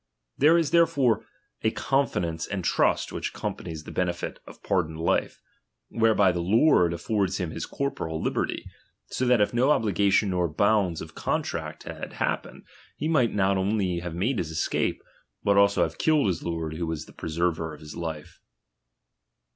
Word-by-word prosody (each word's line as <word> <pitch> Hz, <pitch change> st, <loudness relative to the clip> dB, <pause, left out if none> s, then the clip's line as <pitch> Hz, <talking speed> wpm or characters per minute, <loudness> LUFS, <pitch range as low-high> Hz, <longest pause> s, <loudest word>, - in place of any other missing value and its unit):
There 155 Hz, +4 st, +5 dB
is 160 Hz, -5 st, +1 dB
therefore 130 Hz, -10 st, +3 dB, 0.3 s
a 110 Hz, -, +2 dB
confi 135 Hz, -3 st, 0 dB
dence 80 Hz, -1 st, -3 dB
and 100 Hz, -3 st, -3 dB
trust -, -, +1 dB
which -, -, -3 dB
accompanies 80 Hz, -3 st, -5 dB
the -, -, -9 dB
benefit 90 Hz, -1 st, -2 dB
of -, -, -13 dB
pardoned 80 Hz, -5 st, 0 dB
fife, -, -, 0 dB, 0.5 s
whereby 110 Hz, -4 st, +3 dB
the 85 Hz, -, -3 dB
lord 95 Hz, -, +4 dB
affords 95 Hz, +2 st, -1 dB
him 90 Hz, -4 st, -3 dB
his -, -, -5 dB
corporal 85 Hz, -13 st, -3 dB
liberty; -, -, -2 dB, 0.5 s
so 130 Hz, -, -1 dB
that 125 Hz, -3 st, +4 dB
if 105 Hz, -, +2 dB
no 125 Hz, +4 st, +3 dB
obligation 100 Hz, -6 st, +2 dB
nor 90 Hz, -1 st, +1 dB
bonds 95 Hz, +1 st, +1 dB
of -, -, -9 dB
contract -, -, -3 dB
had -, -, -7 dB
happened, -, -, -3 dB, 0.3 s
he 155 Hz, -, -2 dB
might 130 Hz, -10 st, +2 dB
not 100 Hz, -1 st, +2 dB
only 95 Hz, -2 st, 0 dB
have 85 Hz, -1 st, -6 dB
made 110 Hz, +6 st, 0 dB
his 80 Hz, -, -2 dB
escape, 80 Hz, -1 st, -1 dB, 0.4 s
but 100 Hz, -, +3 dB
also 100 Hz, 0 st, +4 dB
have -, -, -4 dB
killed 155 Hz, -2 st, +3 dB
his 90 Hz, -5 st, 0 dB
lord 80 Hz, -2 st, -3 dB
who 85 Hz, 0 st, -2 dB
was 80 Hz, -2 st, -4 dB
the -, -, -16 dB
preserver 80 Hz, 0 st, -2 dB
of 75 Hz, -, -11 dB
his 75 Hz, -1 st, -9 dB
life. 80 Hz, -3 st, -6 dB
95 Hz, 170 wpm, -26 LUFS, 85-115 Hz, 0.5 s, There